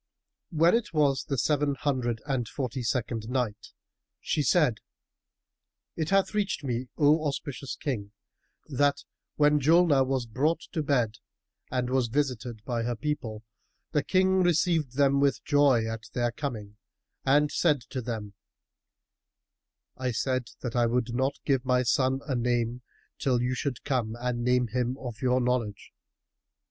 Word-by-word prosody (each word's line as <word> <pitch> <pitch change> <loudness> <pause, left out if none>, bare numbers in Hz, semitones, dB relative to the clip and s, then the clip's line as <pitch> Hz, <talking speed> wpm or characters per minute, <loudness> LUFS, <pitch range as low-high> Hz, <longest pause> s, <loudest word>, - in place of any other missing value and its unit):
When 165 0 +4
it 220 -8 0
was 140 -3 +2
the 135 - -2
Seven 145 +3 +1
Hundred 125 -5 -1
and 130 -6 -1
Forty 130 -1 -3
second 115 -2 -2
Night, 125 -5 -2 0.5
She 150 - -1
said, 145 - +3 1.2
It 160 -1 -2
hath 195 +1 +2
reached 205 -7 -1
me, 125 -1 -2
O 155 +1 +4
auspicious 140 -1 -4
King, 105 -8 -4 0.5
that 145 0 +1 0.3
when 150 0 +4
Julnar 155 -1 +5
was 130 -2 0
brought 145 +9 0
to 160 - -1
bed 120 -7 0 0.5
and 125 -1 -1
was 130 -2 +2
visited 120 -4 -2
by 120 -2 -1
her 120 +1 -1
people, 115 -6 -4 0.5
the 145 - +2
King 190 +4 +2
received 165 -6 +2
them 140 0 +3
with 140 -1 +1
joy 145 -6 +4
at 115 0 -6
their 120 -1 0
coming 110 -6 -5 0.5
and 145 +2 +3
said 150 -6 +2
to 130 - -3
them, 110 -4 -5 1.6
"I 130 0 -1
said 130 +1 0 0.2
that 125 -2 -4
I 120 -1 +3
would 120 0 0
not 130 +3 0
give 135 -3 +2
my 125 -1 +2
son 130 +2 +1
a 140 - -1
name 120 0 0 0.4
till 125 -3 +1
you 125 +1 0
should 130 -2 -3
come 120 -5 -1
and 120 -1 -2
name 125 -1 +2
him 125 +1 -1
of 120 -5 -7
your 125 0 +2
knowledge." 120 -5 -2
130 Hz, 150 wpm, -28 LUFS, 120-145 Hz, 1.6 s, Julnar